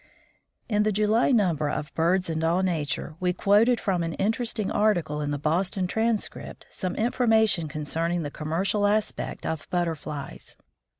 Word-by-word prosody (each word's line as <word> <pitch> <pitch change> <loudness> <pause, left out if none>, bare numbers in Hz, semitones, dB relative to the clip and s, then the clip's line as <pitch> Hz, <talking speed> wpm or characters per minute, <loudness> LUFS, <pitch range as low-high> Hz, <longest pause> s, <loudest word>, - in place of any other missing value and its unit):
In 210 -2 +1
the 215 0 +2
July 215 +3 +2
number 175 - +2
of 150 +1 -4
BIRDS 180 +3 +1
AND 160 -1 -2
ALL 170 +3 +2
NATURE 160 -3 -2
we 180 0 +1
quoted 210 +6 +3
from 185 -3 0
an 165 -1 -3
interesting 225 0 -1
article 175 -8 +1
in 145 - -2
the 145 - -1
Boston 180 +6 0
Transcript 220 +3 -2
some 185 -2 -4
information 220 -7 +2
concerning 165 +3 -2
the 145 - -5
commercial 190 +8 0
aspect 210 +1 -1
of 160 -1 -4
Butterflies. 155 -5 -4
180 Hz, 145 wpm, -26 LUFS, 160-210 Hz, -, quoted